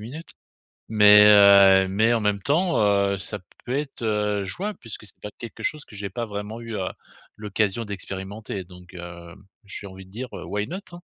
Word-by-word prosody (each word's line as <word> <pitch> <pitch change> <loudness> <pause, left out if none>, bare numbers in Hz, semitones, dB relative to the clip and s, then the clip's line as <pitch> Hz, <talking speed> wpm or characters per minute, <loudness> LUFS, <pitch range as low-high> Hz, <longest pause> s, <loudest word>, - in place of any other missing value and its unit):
minutes. 140 +10 -9 0.6
Mais, 105 -1 +7
heu, 100 -2 +7
mais 110 +5 +2
en 115 - +2
même 105 -1 +1
temps, 170 - +1
heu, 100 -1 +2
ça 105 +2 -5 0.3
peut 125 +2 -2
être, 140 -4 -5
heu, 105 -2 0
jouable 195 - -4
puisque 110 -2 -9
c'est - - -10
pas 105 - -6
quelque 120 -2 -9
chose 150 -1 -2
que 105 - -13
j'ai 100 -1 -4
pas 120 +4 -4
vraiment 105 +2 -6
eu, 115 -2 -6
heu, 95 -2 -2 0.5
l'occasion 105 +1 -1
d'expérimenter, 100 0 -6
donc, 90 0 -15
heu, 85 0 -9 0.3
j'ai 100 +1 -7
envie 95 0 -11
de - - -20
dire, 125 +5 -6
heu, - - -8
Why 105 +1 -3
not, 190 +3 -5
hein? 175 - -10
105 Hz, 195 wpm, -24 LUFS, 95-115 Hz, 0.6 s, Mais